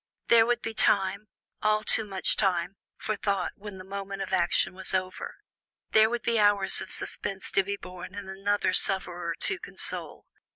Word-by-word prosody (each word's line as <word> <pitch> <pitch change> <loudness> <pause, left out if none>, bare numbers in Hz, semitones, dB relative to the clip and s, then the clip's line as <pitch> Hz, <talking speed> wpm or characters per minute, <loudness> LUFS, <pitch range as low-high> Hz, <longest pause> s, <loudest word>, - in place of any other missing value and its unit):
There 230 -1 +6
would 240 0 0
be 225 - -4
time 200 -1 +1 0.3
all 215 0 +2
too 220 - +2
much 195 -3 0
time 190 -2 0 0.2
for 215 - -3
thought 200 -3 -1
when 205 -1 -10
the 185 - -9
moment 195 0 -6
of 190 - -7
action 175 0 +2
was 190 0 +3
over; 185 0 -4 0.6
there 220 0 +5
would 240 0 -3
be 235 -1 +1
hours 205 -2 +4
of - - -7
suspense 195 -2 -2
to 195 - +3
be 200 +1 -4
borne 180 +1 -10
and 205 -1 -7
another 195 0 -1
sufferer 175 -4 +1
to 385 -2 -1
console. - - -4
195 Hz, 175 wpm, -27 LUFS, 190-215 Hz, 0.6 s, There